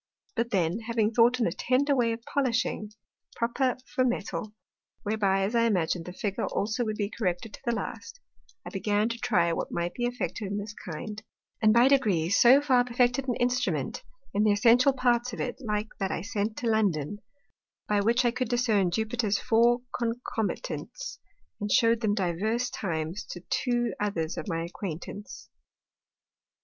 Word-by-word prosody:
But 235 -1 0
then 180 -1 +1
having 225 -1 0
thought 240 +2 +4
on 230 - +2
a - - +1
tender 275 +3 +1
way 240 -3 +2
of 225 0 -5
polishing, 255 -6 -1 0.4
proper 250 +3 0
for 255 - 0
Metal, 210 -5 -2 0.5
whereby, 200 -2 +1
as 200 +4 -1
I 230 -1 +3
imagin'd, 175 -5 0
the 180 - -6
Figure 200 +2 -2
also 220 +4 -1
would 215 -1 -2
be 205 -1 -1
corrected 200 -1 -2
to - - -9
the 240 - 0
last; - - -6 0.5
I - - -7
began 210 +3 +1
to 235 0 -4
try 170 -5 +2
what - - -3
might 175 0 -2
be 240 - -2
effected 245 -3 -3
in 200 +1 -3
this 205 +1 -5
kind, 210 +4 -7 0.4
and 215 -1 +6
by 235 +3 +6
degrees 200 - +3
so 260 +4 +7
far 255 -4 +4
perfected 245 +2 +1
an 245 - 0
Instrument 250 +1 0 0.3
(in 205 - +2
the 215 - +4
essential 240 +6 +5
parts 245 -2 +1
of - - -6
it 245 - -3
like 210 -2 -2
that 195 -2 0
I 170 - -3
sent 210 +1 -2
to 240 - -2
London,) 205 -5 +1 0.7
by 210 -1 +2
which 235 +4 +2
I 240 - +4
could 250 -1 -2
discern 225 -6 +2
Jupiter's 220 +2 0
four 240 0 +3
Concomitants, 250 - -3 0.4
and 205 -1 -3
shew'd 230 0 +4
them 210 -3 +1
divers 215 +6 0
times 165 0 -3
to 175 - -8
two 240 -2 +1
others 180 -6 -1
of - - -6
my 165 -3 -1
Acquaintance. 180 +3 -7
220 Hz, 170 wpm, -28 LUFS, 200-245 Hz, 0.7 s, so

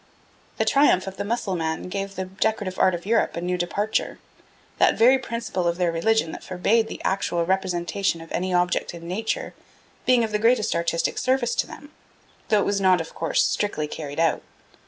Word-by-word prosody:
The - - +1
triumph 275 -10 +4
of 195 0 -7
the - - -2
Mussulman 185 -8 -2
gave 195 +1 -4
the 190 - -3
decorative 190 0 -2
art 185 -1 +4
of 175 - -8
Europe 230 +3 +1
a - - -2
new 180 +1 -1
departure 200 +5 -1 0.6
that - - +4
very 255 +4 +6
principle 230 -7 -3
of 170 0 0
their 175 -2 +1
religion 165 +1 +1
that - - -8
forbade 210 +5 +1
the - - -7
actual 175 -3 0
representation 185 -1 -1
of 165 0 -12
any 185 +1 -1
object 180 -1 0
in 170 0 -9
nature 225 - -3 0.5
being 250 -2 +5
of 220 - -2
the 210 - 0
greatest 230 0 +3
artistic 170 0 0
service 255 -2 +1
to 220 - 0
them, 290 - -12 0.6
though 210 -1 +4
it - - 0
was 200 -1 0
not, 185 -2 +4
of 165 - -6
course, 165 - +1
strictly 155 -8 -1
carried 150 -1 -6
out. 165 -1 +2
190 Hz, 190 wpm, -24 LUFS, 175-220 Hz, 0.6 s, very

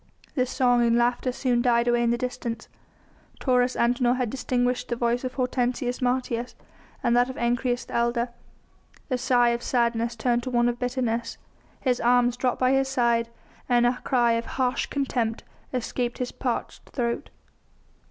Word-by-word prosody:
The 255 -3 +1
song 245 -1 +3
and 235 0 +3
laughter 240 +1 +1
soon 245 -1 0
died 240 -1 +2
away 240 0 +3
in 235 - +2
the 235 - +1
distance. 245 -1 -4 0.7
Taurus 250 -1 +2
Antinor 245 +1 +2
had 250 -4 -1
distinguished 250 -1 -1
the 240 - -1
voice 235 +1 0
of 255 0 -4
Hortensius 250 -1 -1
Martius 245 -1 -1 0.5
and 240 -1 +3
that 245 +1 +3
of 260 - -7
Ancyrus, 245 +1 0
the - - -11
elder. 235 +1 +1 0.8
The 255 -2 0
sigh 245 -1 +3
of 235 0 -1
sadness 235 -1 0
turned 240 +1 +1
to 255 - -4
one 240 -1 +2
of 240 0 -1
bitterness, 240 -2 -2 0.4
his 250 -2 +1
arms 245 0 +3
dropped 250 0 -1
by 255 0 +3
his 270 0 +2
side, 235 -3 +1 0.4
and 240 -1 +4
a 245 +1 +1
cry 240 -2 +3
of 230 0 0
harsh 255 -1 +1
contempt 245 -5 -1 0.3
escaped 245 -1 -2
his 250 -1 -3
parched? - - -4
throat. 235 -2 -2
245 Hz, 165 wpm, -25 LUFS, 235-250 Hz, 0.8 s, and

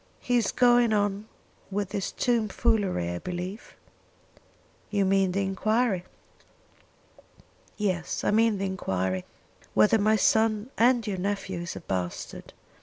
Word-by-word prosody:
"He 245 0 +1
is 235 - +1
going 240 -2 +4
on 205 0 0 0.4
with 200 -1 -2
this 200 -2 -3
tom 235 -3 +1
foolery, 200 - 0
I 85 - -4
believe?" 180 - -6 1.1
"You 200 -2 +1
mean 190 -1 +2
the 200 +2 0
enquiry?" 200 0 0 1.7
"Yes; 185 -4 -2
I - - +2
mean 220 0 +3
the 195 - -2
enquiry 95 - -2 0.5
whether 220 +1 +5
my 215 +2 +3
son 220 +2 +2
and 240 0 +3
your 195 -4 -3
nephew 195 -1 -3
is 170 0 -5
a - - -7
bastard. 90 - -5
205 Hz, 130 wpm, -27 LUFS, 185-220 Hz, 1.7 s, whether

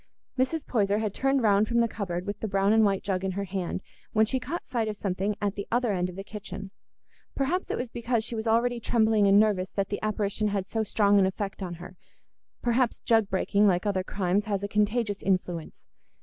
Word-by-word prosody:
Mrs. 275 +5 0
Poyser 205 -4 +1
had 215 -2 -1
turned 270 +1 +1
round 205 0 +4
from 235 +1 +1
the 235 - +4
cupboard 185 -5 -4
with 205 0 -4
the 220 - -3
brown 195 +1 +2
and 220 0 +5
white 195 -2 +1
jug 190 -2 -1
in 190 -1 -1
her 200 +2 -2
hand, 185 -1 -3 0.3
when 220 0 +4
she 260 +4 -1
caught 280 +8 -5
sight 230 -3 -1
of 210 -1 -4
something 195 +1 -1
at 205 -2 -1
the 200 -1 -6
other 240 -2 +1
end 180 -1 0
of 180 - -9
the 195 - -6
kitchen; 200 -1 -8 0.6
perhaps 315 +7 -1
it - - -1
was 245 -2 -4
because 235 -1 -1
she 235 - -5
was 220 0 -3
already 235 +2 +2
trembling 220 -3 +3
and 200 +1 +6
nervous 205 -4 +2
that 195 -1 -2
the 205 - -3
apparition 215 0 -1
had 200 -2 -1
so 225 +3 -2
strong 205 -1 +3
an 190 - +4
effect 195 +1 -4
on 175 -2 -4
her; 180 +2 -11 0.7
perhaps 240 0 +1
jug 225 -3 +3
breaking, 200 +2 +2
like 180 -1 +2
other 195 -2 0
crimes, 190 +1 0
has 200 -2 -2
a - - -1
contagious 210 0 0
influence. 180 -4 -1
205 Hz, 220 wpm, -27 LUFS, 195-225 Hz, 0.7 s, and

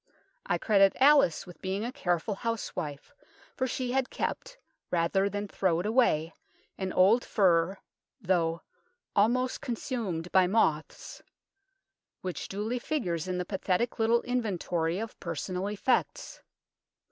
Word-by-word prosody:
I - - +1
credit 195 -3 +4
Alice 280 - +5
with 180 - -13
being 195 +3 -2
a 245 - -3
careful 180 - -1
housewife, 195 - -4 0.4
for 260 - 0
she 250 -1 -2
had 265 0 0
kept, - - -4 0.3
rather 180 +3 +1
than 205 +1 -4
throw 185 -4 0
it 180 - -3
away, 210 -9 +2 0.4
an 190 -1 -3
old 200 +8 +4
fur, 185 -2 +2 0.4
though 170 -5 0 0.3
" 485 0 -49
almost 245 +5 +2
consumed 215 -8 -3
by 185 -1 +5
moths," 160 -7 0 1.0
which 180 -5 -4
duly 215 +5 -3
figures 185 - -2
in 185 -1 -2
the 180 - -2
pathetic 195 +5 -1
little 230 +1 +3
inventory 180 -8 -1
of 225 +2 -6
personal 180 +3 -3
effects. 210 +5 -1
195 Hz, 130 wpm, -29 LUFS, 175-235 Hz, 1.0 s, Alice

